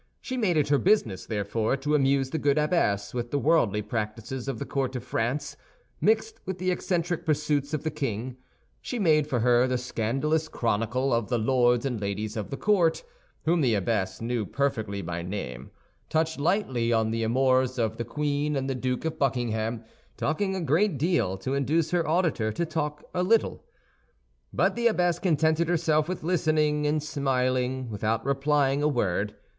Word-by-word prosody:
She 260 - -5
made 205 -9 +1
it 145 -1 +2
her 145 -1 +4
business, 175 - +1
therefore, 110 +3 -1
to 145 +3 -2
amuse 135 -2 +2
the 160 - -1
good 145 0 +2
abbess 150 - +1
with 120 -1 -3
the 145 - 0
worldly 135 -9 +2
practices 115 +4 -4
of 135 -4 -2
the - - -4
court 135 -2 -2
of 125 - -4
France, 130 +4 -2 0.5
mixed 445 0 +1
with 190 -1 -4
the 185 0 0
eccentric 175 -1 -1
pursuits 145 -2 0
of 155 -1 -2
the 155 - -1
king; 125 0 -4 0.4
she 250 - -4
made 155 -8 +3
for 125 -6 0
her 120 +1 +4
the 130 0 0
scandalous 135 +6 -1
chronicle 120 +1 0
of 115 -2 0
the 120 - +1
lords 120 +1 +2
and 125 -5 -2
ladies 105 +2 -3
of 105 -3 -4
the 135 - -4
court, 190 - +2 0.4
whom 165 +1 +3
the 120 -6 +3
abbess 100 -1 -1
knew 115 -1 -1
perfectly 110 -5 -2
by 85 0 -4
name, 85 -9 -6 0.4
touched 160 -1 0
lightly 140 - +1
on 110 -1 +2
the 115 0 -1
amours 130 +2 +2
of 110 -2 -1
the 120 - -2
queen 145 +4 -1
and 135 -1 -1
the 135 - -1
Duke 125 +2 -2
of 160 - -3
Buckingham, 115 -4 -1 0.3
talking 190 +6 -1
a 190 - -2
great 165 +3 +2
deal 145 - +1
to 130 +8 -3
induce 145 +4 +1
her 175 -2 +1
auditor 155 -10 +1
to 170 - -1
talk 150 -2 -3
a 180 - 0
little. 220 +5 +2 0.9
But 190 +2 +1
the 235 0 +2
abbess 180 -6 +1
contented 160 -1 +2
herself 160 -2 +2
with 185 - -4
listening 155 -3 +1
and 150 0 0
smiling 130 -3 -1
without 110 +2 -1
replying 140 0 +2
a 150 - +3
word. 105 -6 0
135 Hz, 180 wpm, -27 LUFS, 115-155 Hz, 0.9 s, her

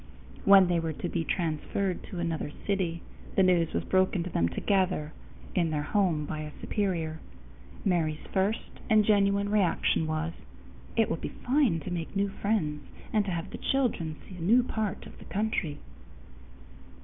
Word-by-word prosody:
When 195 -2 +8
they 175 -1 +2
were 165 -1 -2
to 175 - -4
be 170 -1 -1
transferred 175 +3 -1
to 185 - -8
another 165 -3 -2
city, 180 -5 -1 0.3
the 195 - +5
news 175 -3 +3
was - - -1
broken 185 -1 +2
to 180 - -6
them 85 - +2
together 180 - 0 0.4
in 170 -3 +2
their 150 -1 -1
home 170 -4 +1
by 155 - -4
a 150 -1 -7
superior. 170 -7 -1 0.7
Mary's 160 -5 +1
first 200 +4 -1
and 215 -1 +5
genuine 200 -1 +3
reaction 190 -5 +2
was, 155 +1 -2 0.6
"It 225 -1 +4
will - - -1
be - - -5
fine 250 - +1
to 185 - -6
make 170 +2 -4
new 200 0 +1
friends 195 -8 -1 0.3
and 210 -2 +3
to 195 - -2
have 170 -1 -3
the - - -7
children 230 - 0
see 185 - -10
a - - -8
new 230 +9 +5
part 220 -5 -3
of - - -13
the - - -12
country." 200 -8 -1
180 Hz, 170 wpm, -29 LUFS, 160-200 Hz, 0.7 s, When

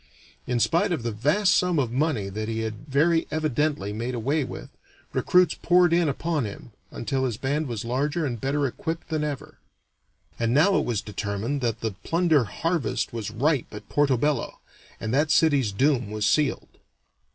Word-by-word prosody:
In 125 -1 0
spite 175 - +2
of 155 -9 -1
the 115 - -1
vast 150 - +2
sum 180 -2 +2
of 130 -5 0
money 130 -6 0
that 110 +2 -4
he 115 0 -2
had 110 +5 -5
very 160 +4 +2
evidently 150 -8 -1
made 120 +4 -3
away 140 +6 0
with, - - -8 0.4
recruits 180 -3 +3
poured 175 -1 +3
in 170 -2 +3
upon 155 +1 -1
him, 105 +3 -8 0.2
until 130 +2 -2
his 120 -5 -1
band 145 +4 -1
was 115 -3 -4
larger 145 +7 -1
and 120 -5 -4
better 140 +2 0
equipped 160 +7 -4
than 155 -2 -1
ever. 145 -3 -5 0.8
And 115 +2 +1
now 185 +7 +5
it - - -1
was 115 -4 -1
determined 105 +5 -3
that 115 -3 -1
the 110 - -1
plunder 165 -6 +2
harvest 165 - -2
was 115 -3 -4
ripe 135 +5 0
at 105 0 -10
Porto 140 -3 +2
Bello, 145 0 -1 0.4
and 110 +1 -3
that 150 +3 +2
city's 145 -9 +3
doom 125 0 +1
was 105 0 -2
sealed. 150 -3 0
140 Hz, 175 wpm, -25 LUFS, 115-155 Hz, 0.8 s, now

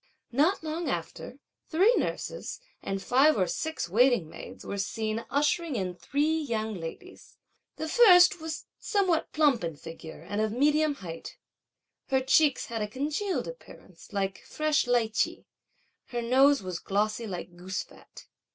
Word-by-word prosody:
Not 310 +9 +2
long 320 +2 -3
after - - -5 0.3
three 380 +9 +4
nurses - - -3 0.2
and 195 0 -4
five 270 +2 +4
or 185 - +3
six 315 - -3
waiting 235 -1 +3
maids - - -10
were 200 - -4
seen 220 +3 -2
ushering 295 +1 +1
in 185 -4 -2
three 295 - 0
young 220 -7 -2
ladies. 185 - -9 0.4
The 315 - -4
first 360 -4 +6
was 320 -1 -5
somewhat 375 -6 +1
plump 290 - +3
in 165 -2 -3
figure 165 +1 -10
and 205 +1 -1
of 220 0 0
medium 300 +3 +2
height; 165 -1 -8 0.7
her 265 -1 +2
cheeks 275 +2 +3
had 230 -2 -4
a 210 - -1
congealed 295 - -2
appearance, - - -12
like 195 -2 -2
a - - -20
fresh 305 -3 +1
lichee; 235 -2 +1 0.6
her 240 -2 -3
nose 265 +1 +4
was 185 -2 -4
glossy 215 +3 -1
like 175 -2 -6
goose 185 +2 -4
fat. - - -16
250 Hz, 150 wpm, -28 LUFS, 200-310 Hz, 0.7 s, first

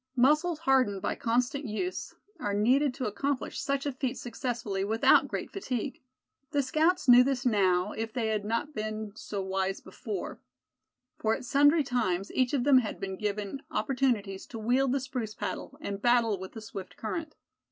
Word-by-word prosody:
Muscles 305 +7 +3
hardened 260 -9 +3
by - - -1
constant 250 +4 0
use 360 - -4 0.2
are 205 -1 -1
needed 255 +7 +3
to 260 - -3
accomplish 265 +6 -2
such 275 0 -1
a 285 - 0
feat 260 0 -3
successfully 230 -5 -3
without 220 +3 +4
great - - -4
fatigue. 260 - -4 0.5
The 285 -1 +1
scouts 310 +3 +2
knew 245 0 +9
this 270 0 -1
now, 190 -4 +3
if 225 0 -4
they 225 -2 -1
had 215 -2 0
not 230 +8 -2
been 215 -2 -4
so 200 -2 -5
wise 190 0 -1
before; 400 - -6 0.8
for 220 0 +2
at - - -8
sundry 290 +4 +5
times 210 -8 -1
each 255 -1 +1
of 275 -4 +1
them 270 -1 +6
had 220 -4 -4
been 195 -1 -4
given 210 +5 -3
opportunities 235 -8 0
to 230 - -8
wield 245 +4 +2
the 275 - +1
spruce 250 -5 -4
paddle, 275 - -5
and 200 -8 -5
battle 235 -4 +3
with 190 0 -8
the 225 - -7
swift 195 -3 -8
current. 310 +8 -4
240 Hz, 175 wpm, -29 LUFS, 210-275 Hz, 0.8 s, knew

